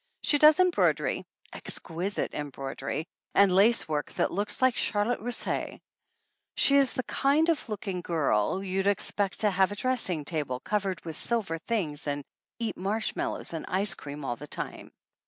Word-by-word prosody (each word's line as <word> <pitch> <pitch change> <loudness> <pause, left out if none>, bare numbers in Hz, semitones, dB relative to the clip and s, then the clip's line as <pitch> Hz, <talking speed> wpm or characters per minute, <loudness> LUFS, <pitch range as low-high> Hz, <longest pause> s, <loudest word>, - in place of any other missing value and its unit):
She 290 - +3
does 305 +2 +7
embroidery 365 -1 +2 0.3
exquisite 180 +4 -2
embroidery, 140 +1 -4 0.3
and 200 -1 +6
lace 215 +5 +5
work 150 -2 -2
that - - 0
looks 205 +3 -1
like 260 -2 +3
charlotte 210 +4 +1
russe. 240 +3 -2 0.8
She 280 - +5
is 275 -2 +4
the 255 - -1
kind 290 +7 +2
of 315 -7 0
looking 195 -3 -4
girl 155 - +1
that 195 - -5
you'd 190 +1 -1
expect 200 0 +1
to 210 -1 +3
have 190 +1 +2
a - - -4
dressing 205 - -1
table 145 -6 -2
covered 195 +1 -2
with 160 -2 -4
silver 205 -9 -1
things 160 -9 -2
and 145 0 -2 0.3
eat 230 -2 -3
marshmallows 200 -1 -2
and 160 - -4
ice 195 +3 +1
cream 145 0 -8
all 120 - -2
the 150 - -9
time. - - -5
195 Hz, 160 wpm, -28 LUFS, 160-230 Hz, 0.8 s, does